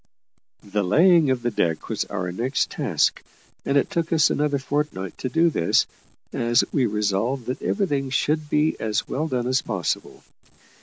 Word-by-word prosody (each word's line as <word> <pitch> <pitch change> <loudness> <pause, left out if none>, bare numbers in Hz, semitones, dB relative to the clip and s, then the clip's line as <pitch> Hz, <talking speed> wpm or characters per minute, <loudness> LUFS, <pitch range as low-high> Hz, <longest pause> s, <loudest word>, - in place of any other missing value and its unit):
The 105 +1 -2
laying 165 - +5
of 130 -2 0
the 120 - 0
deck 85 -6 -1
was - - -2
our 90 -3 -4
next 120 +9 -1
task; - - 0 0.4
and 140 - +1
it 140 - +1
took 170 -1 -1
us 165 -1 +4
another 145 -1 +1
fortnight 135 - -3
to 130 - -3
do 165 +3 +3
this, 85 - +2 0.5
as 120 0 +2
we 130 -5 +2
resolved 105 +4 -1
that 125 - -4
everything 145 -10 -1
should 150 +3 0
be 150 +2 +2
as 110 -1 -1
well 155 +4 -2
done 125 -5 -2
as 130 +1 +1
possible. 95 -7 -3
130 Hz, 165 wpm, -23 LUFS, 105-150 Hz, 0.5 s, laying